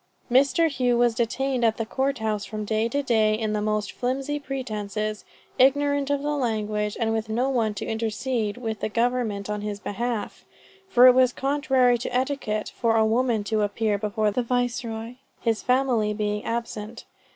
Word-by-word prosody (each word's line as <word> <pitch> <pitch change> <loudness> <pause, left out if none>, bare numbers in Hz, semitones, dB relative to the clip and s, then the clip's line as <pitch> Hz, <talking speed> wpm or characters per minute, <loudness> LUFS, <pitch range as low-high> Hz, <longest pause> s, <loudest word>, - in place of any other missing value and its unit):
Mr. 275 +6 +4
Hough 250 -5 +1
was 240 -1 +3
detained 245 +2 -1
at 225 -1 +3
the 225 - -2
court 270 +4 -1
house 215 -2 -2
from 215 -1 -5
day 220 +2 0
to 285 +4 -1
day 220 -4 +2
on 215 -1 0
the 210 - -1
most 215 -1 -1
flimsy 270 +4 -2
pretences, 215 -6 -4 0.4
ignorant 285 +1 +3
of 285 0 0
the 295 0 0
language, 215 -5 -1
and 225 -1 +1
with 220 0 -2
no 245 +5 0
one 225 -5 0
to - - -4
intercede 225 0 -2
with 225 -4 -4
the - - -2
government 230 -3 0
in 210 0 -3
his 205 -1 -4
behalf, 230 +2 -4 0.5
for 250 -5 +6
it 255 - +9
was 255 0 +4
contrary 265 -3 +2
to - - -4
etiquette 250 -5 -1
for 230 -1 +1
a 220 -1 +4
woman 230 -1 +1
to 215 +1 0
appear 205 0 0
before 210 0 0
the 250 - 0
Viceroy, 240 -1 -2 0.2
his 225 -4 0
family 250 -5 +1
being 210 0 -2
absent. 230 -1 -4
230 Hz, 175 wpm, -25 LUFS, 215-255 Hz, 0.5 s, it